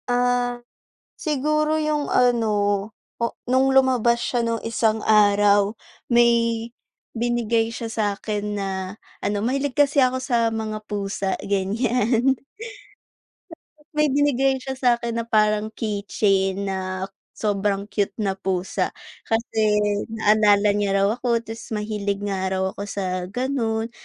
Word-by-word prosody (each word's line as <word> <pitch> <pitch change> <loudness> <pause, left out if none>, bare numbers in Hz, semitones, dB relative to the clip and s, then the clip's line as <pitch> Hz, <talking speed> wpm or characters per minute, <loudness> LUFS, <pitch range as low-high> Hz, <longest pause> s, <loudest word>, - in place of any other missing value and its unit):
Ah, 245 0 +1 0.6
siguro 305 +1 0
yung 305 -1 -1
ano, 210 -5 +2 0.3
o - - +2 0.2
nung 260 +1 +3
lumabas 255 -3 +4
siya 245 - -1
nung 230 -1 -1
isang 220 -1 0
araw, 205 0 +4 0.3
may 235 -1 +3 0.5
binigay 230 -1 +1
siya 230 0 -5
sakin 210 -1 -2
na 195 - -2 0.6
ano 205 0 0
mahilig 275 +3 0
kasi 285 -1 +4
ako 255 0 0
sa 240 -3 +1
mga 215 -1 -4
pusa 200 -2 -3
ganyan. 230 +5 +1 1.6
May 300 0 +3
binigay 270 -1 +2
siya 265 0 -6
sakin 235 -2 +1
na 230 - -4
parang 215 -1 +2
keychain 200 -2 0
na 190 -1 -3 0.3
sobrang 200 -1 0
cute 205 -2 -1
na 195 -1 -2
pusa. 190 -1 -1 0.4
Kasi 225 0 -1 0.5
naalala 210 -2 +3
niya 200 -1 0
raw 195 0 +3
ako 235 -2 0
ta's 225 0 -8
mahilig 205 -1 -3
nga 195 -2 -2
raw 190 0 -1
ako 200 +1 -7
sa 185 -3 -3
ganun. 230 0 -2
225 Hz, 120 wpm, -23 LUFS, 205-245 Hz, 1.6 s, lumabas